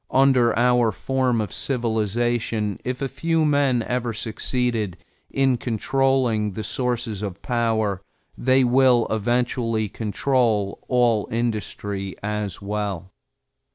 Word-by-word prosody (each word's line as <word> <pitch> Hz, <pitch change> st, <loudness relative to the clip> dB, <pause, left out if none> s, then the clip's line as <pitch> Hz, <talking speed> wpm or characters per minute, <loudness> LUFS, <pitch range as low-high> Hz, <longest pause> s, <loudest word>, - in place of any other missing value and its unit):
Under 130 Hz, -4 st, +4 dB
our 120 Hz, -1 st, +3 dB
form 130 Hz, +2 st, 0 dB
of 105 Hz, -4 st, -3 dB
civilization, 115 Hz, -3 st, -1 dB
if 130 Hz, +2 st, -3 dB
a -, -, 0 dB
few 165 Hz, +3 st, 0 dB
men 140 Hz, -5 st, +2 dB
ever 125 Hz, 0 st, -2 dB
succeed 110 Hz, -3 st, -2 dB, 0.3 s
in 135 Hz, -2 st, +2 dB
controlling 120 Hz, -2 st, +1 dB
the 110 Hz, -, -5 dB
sources 120 Hz, -5 st, -2 dB
of 100 Hz, -2 st, -6 dB
power, 110 Hz, -5 st, 0 dB, 0.3 s
they 130 Hz, +1 st, +3 dB
will 125 Hz, -1 st, +4 dB
eventually 115 Hz, 0 st, 0 dB
control 110 Hz, -1 st, 0 dB
all 120 Hz, -4 st, +2 dB
industry 105 Hz, -4 st, -3 dB
as 105 Hz, -2 st, -3 dB
well. 100 Hz, -3 st, -3 dB
115 Hz, 110 wpm, -23 LUFS, 105-125 Hz, 0.3 s, Under